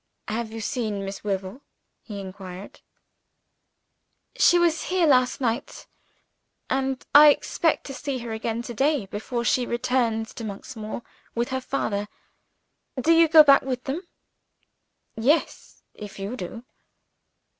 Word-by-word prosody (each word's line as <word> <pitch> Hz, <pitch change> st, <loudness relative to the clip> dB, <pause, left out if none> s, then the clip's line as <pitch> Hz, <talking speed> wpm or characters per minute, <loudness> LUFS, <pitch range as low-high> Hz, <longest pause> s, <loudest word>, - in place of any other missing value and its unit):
"Have 220 Hz, +1 st, -3 dB
you 225 Hz, 0 st, -6 dB
seen 215 Hz, -3 st, -2 dB
Miss 195 Hz, 0 st, -7 dB
Wyvil?" 195 Hz, +4 st, -3 dB, 0.4 s
he 205 Hz, -3 st, -8 dB
inquired. 190 Hz, 0 st, -9 dB, 1.5 s
"She 350 Hz, -, +5 dB
was 340 Hz, -2 st, +2 dB
here 365 Hz, -2 st, +2 dB
last 255 Hz, -4 st, +3 dB
night; 240 Hz, 0 st, -3 dB, 0.9 s
and 265 Hz, 0 st, -1 dB
I 295 Hz, +1 st, +10 dB
expect 320 Hz, +2 st, +1 dB
to 275 Hz, -, -6 dB
see 280 Hz, 0 st, -4 dB
her 235 Hz, -2 st, -6 dB
again 225 Hz, +1 st, -3 dB
to 240 Hz, -, -7 dB
day 275 Hz, -1 st, +1 dB
before 220 Hz, +5 st, -4 dB
she 245 Hz, +2 st, +2 dB
returns 235 Hz, -2 st, 0 dB
to 230 Hz, -, -8 dB
Monksmoor 215 Hz, +2 st, -7 dB, 0.3 s
with 235 Hz, +1 st, -1 dB
her 260 Hz, 0 st, -2 dB
father. 205 Hz, -6 st, -2 dB, 0.9 s
Do 290 Hz, +6 st, +2 dB
you 330 Hz, 0 st, +6 dB
go 315 Hz, 0 st, +9 dB
back 280 Hz, -2 st, +6 dB
with 255 Hz, -1 st, -4 dB
them?" 280 Hz, +6 st, -3 dB, 1.1 s
"Yes 265 Hz, +9 st, 0 dB
if 205 Hz, -1 st, -10 dB
you 200 Hz, +5 st, -4 dB
do." 230 Hz, +2 st, -7 dB
240 Hz, 135 wpm, -25 LUFS, 215-275 Hz, 1.5 s, I